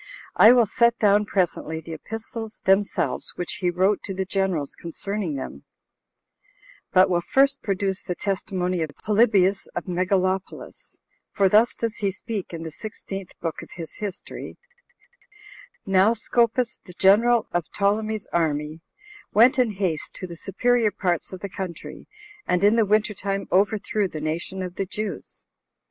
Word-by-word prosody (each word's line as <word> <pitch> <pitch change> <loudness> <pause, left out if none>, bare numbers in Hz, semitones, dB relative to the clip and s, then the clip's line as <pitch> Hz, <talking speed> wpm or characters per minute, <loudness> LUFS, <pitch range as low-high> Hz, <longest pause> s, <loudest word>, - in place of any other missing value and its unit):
I 220 - +8
will 245 -2 +5
set 235 +3 +2
down 205 0 +3
presently 170 -4 -1
the 160 +1 -8
epistles 225 +5 -7
themselves 190 -9 +1
which 175 - -4
he 180 - +2
wrote 190 +3 +2
to 195 - -5
the 190 0 -2
generals 185 -7 -1
concerning 185 0 -4
them, 70 - -7 1.3
but 185 +1 +6
will 175 -2 +1
first 275 +9 +2
produce 195 -1 -1
the 180 - -4
testimony 185 -2 -2
of 160 - -1 0.2
Polybius 205 -3 +3
of - - -2
Megalopolis; 185 +1 -2 0.3
for 195 - +3
thus 215 +5 +4
does 230 -1 -3
he 200 - 0
speak, 205 0 -5
in 165 -1 -6
the 160 - -6
sixteenth 195 0 -8
book 165 -2 -3
of - - -12
his 165 -3 -6
history: 205 -2 -6 1.3
"Now 195 +4 +4
Scopas, 235 +1 +1
the 180 - -12
general 220 +5 +4
of 175 -2 -2
Ptolemy's 215 +1 0
army, 155 -1 -1 0.5
went 245 +5 +6
in 245 -2 +3
haste 185 -6 -2
to - - -6
the 170 -2 -8
superior 225 +6 +1
parts 180 -5 -1
of 185 -2 -8
the 200 - -3
country, 185 -3 -7 0.4
and 180 +1 +1
in 205 +2 +5
the 225 -3 +3
winter 210 +1 +2
time 195 0 -3
overthrew 205 +1 +1
the 155 - -7
nation 165 +5 -3
of 180 0 -7
the 195 - -1
Jews?" 210 +2 -6
195 Hz, 155 wpm, -24 LUFS, 180-215 Hz, 1.3 s, I